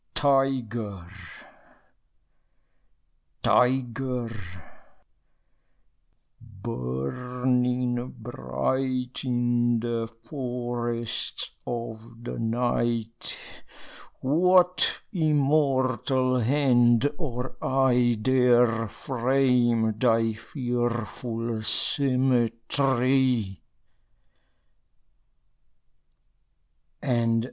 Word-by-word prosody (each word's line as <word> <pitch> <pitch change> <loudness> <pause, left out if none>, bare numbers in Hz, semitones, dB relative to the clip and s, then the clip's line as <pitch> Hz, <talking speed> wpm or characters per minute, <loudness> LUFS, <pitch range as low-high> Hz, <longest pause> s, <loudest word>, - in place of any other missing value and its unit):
Tyger, 120 -9 +1 2.4
tyger, 125 -1 +1 2.1
burning 125 - -2
bright 125 - -3
In 120 -2 +1
the 115 -1 -2 0.2
forests 120 -3 -3 0.2
of 115 0 -6
the - - -5
night, 115 0 -1 0.8
What 180 +5 +3
immortal 135 - +1
hand 120 -1 +3
or 130 -5 -4
eye 125 -3 +2
Dare 120 -2 +3
frame 120 -2 +1
thy 115 -2 +2
fearful 120 -1 -3
symmetry? 125 -2 +1
120 Hz, 45 wpm, -26 LUFS, 115-130 Hz, 2.4 s, What